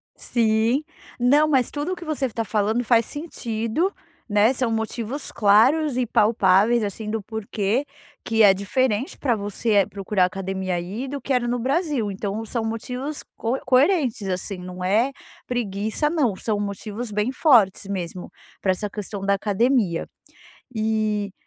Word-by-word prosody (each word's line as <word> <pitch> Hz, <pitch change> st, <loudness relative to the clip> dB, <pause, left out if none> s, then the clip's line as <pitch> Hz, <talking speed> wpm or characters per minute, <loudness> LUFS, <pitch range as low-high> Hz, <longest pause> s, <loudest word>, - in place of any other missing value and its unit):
Sim. 230 Hz, +4 st, +1 dB, 0.4 s
Não, 285 Hz, +5 st, +4 dB
mas 265 Hz, -5 st, +2 dB
tudo 300 Hz, +5 st, -2 dB
o -, -, -3 dB
que 345 Hz, -, -10 dB
você 300 Hz, -3 st, -1 dB
está 230 Hz, -2 st, -2 dB
falando 220 Hz, +3 st, 0 dB
faz 230 Hz, -1 st, +3 dB
sentido, 270 Hz, -, -2 dB, 0.4 s
né, 210 Hz, +4 st, +4 dB
são 250 Hz, -3 st, -1 dB
motivos 225 Hz, +4 st, -3 dB
claros 245 Hz, +8 st, +4 dB
e 255 Hz, -, +1 dB
palpáveis, 215 Hz, +1 st, +3 dB
assim, 210 Hz, +1 st, -4 dB
do 220 Hz, -1 st, -2 dB
porquê 220 Hz, +3 st, -2 dB, 0.4 s
que 225 Hz, -1 st, +1 dB
é 200 Hz, -3 st, +8 dB
diferente 220 Hz, +5 st, -1 dB
pra 250 Hz, -5 st, +1 dB
você, 205 Hz, +2 st, -2 dB
eh, 200 Hz, -2 st, +5 dB
procurar 195 Hz, -1 st, 0 dB
academia 190 Hz, 0 st, -3 dB
aí 195 Hz, +9 st, -4 dB
do 285 Hz, -, -4 dB
que 275 Hz, -, -2 dB
era 245 Hz, -1 st, +1 dB
no 245 Hz, 0 st, 0 dB
Brasil. 275 Hz, -, 0 dB
Então 205 Hz, +3 st, -4 dB
são 230 Hz, +1 st, -2 dB
motivos 250 Hz, +6 st, -4 dB
coe 240 Hz, +4 st, -1 dB
coerentes, 255 Hz, -, +2 dB
assim. 185 Hz, +2 st, -3 dB
Não 180 Hz, 0 st, -7 dB
é 220 Hz, +8 st, +2 dB, 0.3 s
preguiça 220 Hz, +4 st, -1 dB
não, 280 Hz, -, +1 dB
são 210 Hz, +1 st, -2 dB
motivos 210 Hz, +3 st, -5 dB
bem 210 Hz, +5 st, 0 dB
fortes 230 Hz, -, +4 dB
mesmo, 180 Hz, -2 st, -5 dB, 0.3 s
pra 190 Hz, -, +2 dB
essa 205 Hz, +3 st, -3 dB
questão 205 Hz, -1 st, -6 dB
da 200 Hz, 0 st, +2 dB
academia. 205 Hz, -2 st, +1 dB, 0.7 s
E 215 Hz, -2 st, 0 dB
220 Hz, 155 wpm, -23 LUFS, 200-255 Hz, 0.7 s, é